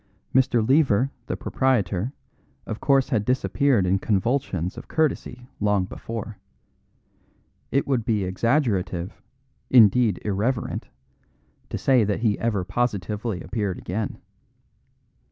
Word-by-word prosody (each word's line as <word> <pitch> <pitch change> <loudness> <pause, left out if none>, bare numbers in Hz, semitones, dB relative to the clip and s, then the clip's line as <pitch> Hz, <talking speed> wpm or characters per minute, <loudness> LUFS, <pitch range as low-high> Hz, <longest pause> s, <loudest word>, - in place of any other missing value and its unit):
Mr. 125 -4 +3
Lever, 135 -3 +3 0.2
the - - -3
proprietor, 115 -4 0 0.5
of 110 - -5
course 135 -1 +3
had 115 -7 +1
disappeared 130 -2 +2
in 95 +2 +2
convulsions 95 - -1
of 120 - -10
courtesy 125 -5 -1
long 105 -2 +2
before. 110 +1 -7 1.3
It 140 - +1
would 130 -5 0
be 105 -3 0
exaggerative, 95 - -1 0.5
indeed 115 -4 +5
irreverent, 105 +5 -1 0.8
to - - -3
say 130 -4 +3
that 105 +1 -1
he 110 -3 +1
ever 105 -5 0
positively 105 0 -2
appeared 100 +1 -2
again. 105 +3 -4
110 Hz, 110 wpm, -24 LUFS, 100-125 Hz, 1.3 s, indeed